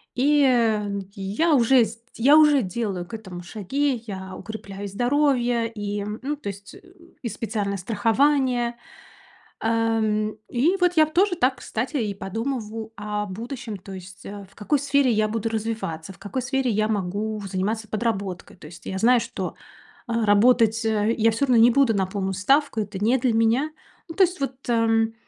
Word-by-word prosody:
И, 290 +3 +3
э, 215 -5 +1
я 205 - 0
уже 250 0 +5
сд 230 +2 -9 0.2
я 280 +6 +6
уже 295 -3 +6
делаю 195 -3 -3
к 175 - -16
этому 190 -5 -7
шаги. 240 +6 -2
Я 190 -2 -6
укрепляю 200 -2 -7
здоровье 245 +1 +1
и, 205 -1 -4 0.2
ну, 290 +3 -2
то 280 - -10
есть, 200 +1 -10 0.5
и 235 - -2
специальное 205 -3 -3
страхование, 240 +4 +1 0.9
ам. 225 -1 +1 0.2
И 295 +10 +2
вот 355 0 +3
я 310 - +7
в 310 - -13
тоже 370 0 +3
так, 260 -4 +2
кстати, 250 +7 -4
и 210 -4 -2
подумываю 225 +1 -4
о 210 0 -3
будущем. 230 +3 -6
То 195 +1 -11
есть, 185 0 -11
э, 200 -1 -8
в - - -24
какой 260 +7 0
сфере 280 -1 +2
я 215 -1 +2
буду 225 +1 -2
развиваться, 215 -6 -4
в - - -20
какой 205 +6 -4
сфере 265 0 0
я 215 0 +1
могу 210 +1 -2
заниматься 205 +4 -2
подработкой. 200 -5 -3
То 165 - -13
есть 165 +2 -13
я 190 - -4
знаю, 240 +4 +4
что, - - -5 0.5
а, 230 -1 0
работать, 225 +2 +4
э, 220 0 +1
я 225 0 +4
всё 225 +6 0
равно 250 -3 +3
не 240 - +7
буду 270 -3 +3
на 195 -1 +1
полную 190 0 -3
ставку. 230 +5 +2
Это 200 -1 -6
не 230 +5 +3
для 245 -2 +1
меня. 230 +7 +2 0.4
Ну, 330 - -7
то 385 - +5
есть, 360 0 0
вот, 270 -1 -2
ам, 225 -1 +2
225 Hz, 175 wpm, -24 LUFS, 205-255 Hz, 0.9 s, я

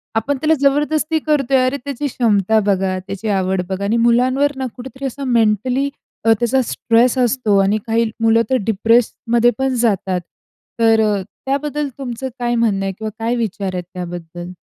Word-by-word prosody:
आपण 265 +6 0
त्याला 315 +1 +3
जबरदस्ती 300 +3 +1
करतोय, 280 -4 +1
अरे, 255 +2 0
त्याची 285 +1 -3
क्षमता 220 -4 +2
बघा, 190 -2 +1
त्याची 200 +2 -5
आवड 190 -2 0
बघा 190 +1 -3
आणि 220 +4 +1
मुलांवर 255 +4 +3
ना, 265 - -2
कुठेतरी 265 +2 -8
असा 270 +1 -4
मेंटली 245 +3 +1 0.4
अ, 225 - +5
त्याचा 250 +2 +2
स्ट्रेस 235 +3 +2
असतो 245 -4 +2
आणि 200 +2 +2
काही 230 +1 +2 0.2
मुलं 225 0 +4
तर 260 - +2
डिप्रेस्डमध्ये 230 +2 +2
पण 265 -1 0
जातात. 190 -5 0 0.6
तर 225 -1 +4
अ, 210 -2 +1 0.2
त्याबद्दल 285 +1 -1
तुमचं 260 -1 -5
काय 240 0 0
म्हणणं 210 -4 +1
आहे 195 - -1
किंवा 220 0 -4
काय 230 +2 0
विचार 205 -4 -3
आहेत 180 - -3
त्याबद्दल? 175 -1 -7
230 Hz, 165 wpm, -18 LUFS, 205-265 Hz, 0.6 s, अ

